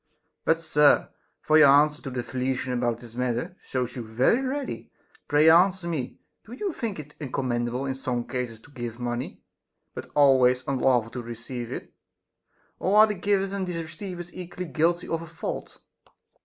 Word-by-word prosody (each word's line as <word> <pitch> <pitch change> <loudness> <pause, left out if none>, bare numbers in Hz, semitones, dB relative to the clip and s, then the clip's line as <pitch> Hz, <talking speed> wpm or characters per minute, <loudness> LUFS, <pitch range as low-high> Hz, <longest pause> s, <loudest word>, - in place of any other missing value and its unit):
But, 165 0 +2
sir, 150 -2 +4 0.2
— - - -47
for 155 0 +5
your 155 - +9
answer 150 +2 +5
to - - -6
the 125 -1 -3
Thessalian 130 0 -2
about 120 -1 -1
this 120 -2 -12
matter 125 +8 -2
shows 125 -2 -3
you 125 - -4
very 120 - +2
ready, 270 +1 -4 0.2
— - - -31
pray 150 +2 +4
answer 180 +2 +5
me, 155 -7 -3 0.3
do 230 - -12
you 380 +7 -3
think 230 -8 -4
it 150 -1 -9 0.2
commendable 125 0 -1
in 135 - -1
some 125 -2 -2
cases 125 -3 -4
to 145 - -18
give 120 -3 -6
money, 120 +1 -4 0.5
but - - -8
always 130 -3 +5
unlawful 125 -4 +2
to 125 - -5
receive 120 +1 -7
it? - - -7 0.9
Or 195 +3 +2
are 215 - +9
the 210 - -2
givers 195 0 0
and 195 -2 -2
receivers 175 +1 -6
equally 180 0 -6
guilty 165 +3 0
of 165 0 -2
a 165 - -8
fault? 165 - -6
140 Hz, 175 wpm, -26 LUFS, 125-175 Hz, 0.9 s, your